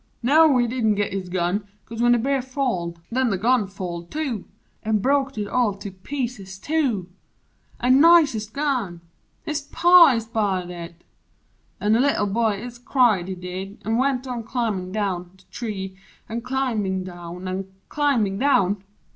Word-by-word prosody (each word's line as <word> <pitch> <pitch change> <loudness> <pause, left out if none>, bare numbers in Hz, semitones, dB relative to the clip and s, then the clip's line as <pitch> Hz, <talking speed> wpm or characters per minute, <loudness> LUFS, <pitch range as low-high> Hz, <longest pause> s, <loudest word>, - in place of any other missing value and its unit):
no, 295 +2 +5
he 240 - +3
didn't 230 -3 +1
git 205 -1 -1
his 190 -2 -4
gun 185 +3 -1 0.2
'cause 230 0 -6
when 240 0 +5
The - - +4
Bear 270 +3 0
falled, 245 -11 -2
nen 255 +1 +1
the 195 - 0
gun 230 +1 +2
falled, 175 -3 -6
too 275 -10 -3 0.4
An' 220 -1 +1
broked 275 +3 +1
It 205 -1 -2
all 225 -3 +1
to 200 0 -8
pieces, 195 -2 -5
too! 250 - -1 0.7
An' 255 +3 +4
nicest 295 -11 +5
gun! 250 - -2 0.4
His 305 -1 -2
Pa 345 +1 +6
ist 225 -1 -4
buyed 190 -5 0
it! 170 -1 -9 0.8
An' 210 +1 +2
the 225 - +4
Little 270 -5 +2
Boy 215 0 +1
Ist 240 0 -9
cried, 230 -9 +3
he 190 - -4
did; 185 +3 -7
an' 225 +1 +1
went 260 0 +1
on 250 -2 -4
climbin' 215 -6 -2
down 190 -4 -2
The 190 - -22
tree 200 -5 -5 0.3
an' 230 +2 -4
climbin' 230 -7 -1
down 175 0 -8
an' 190 +1 -4 0.2
climbin' 240 -10 +1
down! 205 -8 +2
220 Hz, 165 wpm, -23 LUFS, 190-255 Hz, 0.8 s, Pa